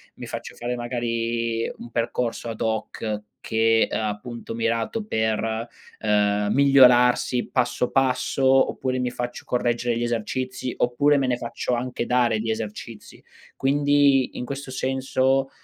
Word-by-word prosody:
mi -, -, -8 dB
faccio -, -, -7 dB
fare 120 Hz, +1 st, -3 dB
magari 115 Hz, -1 st, -2 dB
un 120 Hz, -, -10 dB
percorso 115 Hz, 0 st, -2 dB
ad 110 Hz, -, -6 dB
hoc 110 Hz, -1 st, -2 dB, 0.2 s
che 115 Hz, 0 st, +2 dB
è, -, -, -5 dB
appunto, 110 Hz, +2 st, -4 dB
mirato 115 Hz, -, -1 dB
per, 110 Hz, -, -1 dB, 0.3 s
ehm, 105 Hz, -1 st, +1 dB
migliorarsi 125 Hz, -3 st, +5 dB
passo 125 Hz, -1 st, 0 dB
passo, 135 Hz, 0 st, +1 dB, 0.3 s
oppure 130 Hz, -1 st, -2 dB
mi 125 Hz, -1 st, -1 dB
faccio 120 Hz, 0 st, -5 dB
correggere 120 Hz, -1 st, 0 dB
gli 120 Hz, -, -2 dB
esercizi, 125 Hz, +2 st, -2 dB
oppure 140 Hz, +4 st, +2 dB
me 135 Hz, -2 st, +1 dB
ne 125 Hz, -1 st, +1 dB
faccio 120 Hz, +1 st, -3 dB
anche 120 Hz, 0 st, -3 dB
dare 120 Hz, -3 st, +2 dB
di 110 Hz, +1 st, -3 dB
esercizi. 110 Hz, 0 st, -6 dB, 0.3 s
Quindi, 140 Hz, -1 st, +3 dB
in -, -, -3 dB
questo 140 Hz, 0 st, -6 dB
senso, 130 Hz, +1 st, 0 dB
120 Hz, 135 wpm, -24 LUFS, 115-130 Hz, 0.3 s, migliorarsi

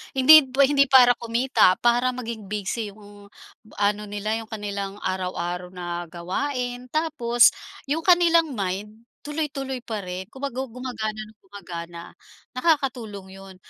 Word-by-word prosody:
hindi, 280 Hz, +2 st, +8 dB
hindi 280 Hz, +2 st, +3 dB
para 255 Hz, -2 st, +7 dB
kumita 235 Hz, -4 st, +3 dB
para 245 Hz, +1 st, +2 dB
maging 230 Hz, -4 st, -6 dB
busy 210 Hz, +2 st, -3 dB
'yong 205 Hz, 0 st, -14 dB, 0.5 s
ano 205 Hz, +1 st, +1 dB
nila 210 Hz, +2 st, -3 dB
'yong 225 Hz, -, -9 dB
kanilang 200 Hz, -2 st, -5 dB
araw-araw 180 Hz, -1 st, -3 dB
na 175 Hz, -1 st, -5 dB
gawain. 245 Hz, -, -4 dB
Tapos, 250 Hz, -5 st, +3 dB, 0.4 s
'yong 320 Hz, +3 st, -1 dB
kanilang 335 Hz, -5 st, +4 dB
mind 205 Hz, +3 st, -4 dB, 0.2 s
tuloy-tuloy 275 Hz, -4 st, -4 dB
pa 220 Hz, -3 st, -4 dB
rin 185 Hz, -1 st, -6 dB
kumbaga 265 Hz, -1 st, -4 dB
gumagana 230 Hz, -4 st, -5 dB
nang 215 Hz, 0 st, -9 dB
gumagana. 170 Hz, -4 st, -9 dB, 0.5 s
Nakakatulong 255 Hz, -, -1 dB
'yon. 195 Hz, -1 st, -12 dB
225 Hz, 125 wpm, -24 LUFS, 200-265 Hz, 0.5 s, hindi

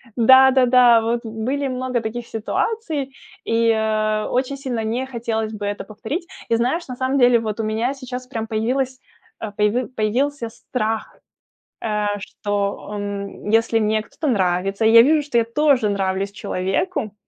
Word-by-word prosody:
Да-да-да, 250 Hz, -1 st, +6 dB
вот 230 Hz, +1 st, 0 dB
были 250 Hz, +6 st, -2 dB
много 255 Hz, -2 st, -2 dB
таких 230 Hz, +2 st, -5 dB
ситуаций, 285 Hz, -, -2 dB, 0.3 s
и, 230 Hz, 0 st, +2 dB
а, 215 Hz, -1 st, 0 dB
очень 260 Hz, +2 st, -1 dB
сильно 250 Hz, -5 st, -3 dB
не 240 Hz, +4 st, -2 dB
хотелось 225 Hz, -3 st, -3 dB
бы 205 Hz, -1 st, -5 dB
это 205 Hz, 0 st, -3 dB
повторить. 280 Hz, -, -5 dB, 0.2 s
И 230 Hz, -, +3 dB
знаешь, 255 Hz, +9 st, 0 dB
на 250 Hz, -, -6 dB
самом 260 Hz, +2 st, 0 dB
деле, 245 Hz, -1 st, +5 dB
вот 220 Hz, -1 st, -4 dB
у -, -, 0 dB
меня 225 Hz, +5 st, -1 dB
сейчас 255 Hz, -2 st, -7 dB
прям 225 Hz, -4 st, -4 dB
появилась, 255 Hz, +4 st, -1 dB, 0.4 s
а, 215 Hz, -2 st, -5 dB
появи 210 Hz, +5 st, +1 dB
появился 245 Hz, +2 st, -1 dB
страх, 220 Hz, -1 st, -4 dB, 0.6 s
э, 210 Hz, -2 st, -1 dB
что, 205 Hz, 0 st, -3 dB
эм, 200 Hz, 0 st, -5 dB
если 225 Hz, 0 st, +3 dB
мне 215 Hz, 0 st, +1 dB
кто-то 305 Hz, +8 st, -6 dB
нравится 195 Hz, 0 st, 0 dB
и 220 Hz, -, +5 dB
я 230 Hz, -, +10 dB
вижу, 300 Hz, +3 st, +3 dB
что 275 Hz, -5 st, 0 dB
я 230 Hz, -, +3 dB
тоже 260 Hz, -2 st, +2 dB
нравлюсь 195 Hz, 0 st, -1 dB
человеку, 205 Hz, -, -2 dB
230 Hz, 155 wpm, -21 LUFS, 215-255 Hz, 0.6 s, я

